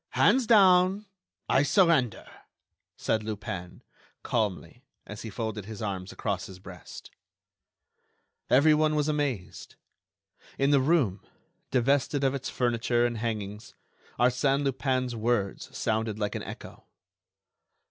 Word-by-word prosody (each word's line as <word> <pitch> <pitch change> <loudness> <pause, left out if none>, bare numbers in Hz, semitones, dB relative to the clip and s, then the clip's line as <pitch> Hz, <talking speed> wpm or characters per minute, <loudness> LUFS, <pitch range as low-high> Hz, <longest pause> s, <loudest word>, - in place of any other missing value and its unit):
"Hands 260 -3 +3
down! 190 -2 +5 0.4
I 135 - +3
surrender!" 150 - +2 0.7
said 110 - 0
Lupin, 100 -4 -6 0.4
calmly; 105 -5 -2 0.2
and 105 0 -9
he 115 - -7
folded 110 -1 -4
his 110 -1 -8
arms 95 -2 -4
across 100 -6 -3
his 95 - -11
breast. 90 -4 -12 1.4
Everyone 155 +3 +4
was 150 0 +1
amazed. 145 -10 -3 0.8
In 135 +1 +2
the 140 -2 +4
room, 130 - +1 0.5
divested 135 +2 +1
of 135 0 +2
its 135 -1 -4
furniture 120 -1 +1
and 120 -2 -2
hangings, 105 -2 -5 0.4
Arsène 135 +3 +2
Lupin's 130 -2 -1
words 110 -3 -1
sounded 110 -1 -1
like 105 -1 -2
an - - -4
echo.... - - -10
120 Hz, 115 wpm, -28 LUFS, 105-140 Hz, 1.4 s, down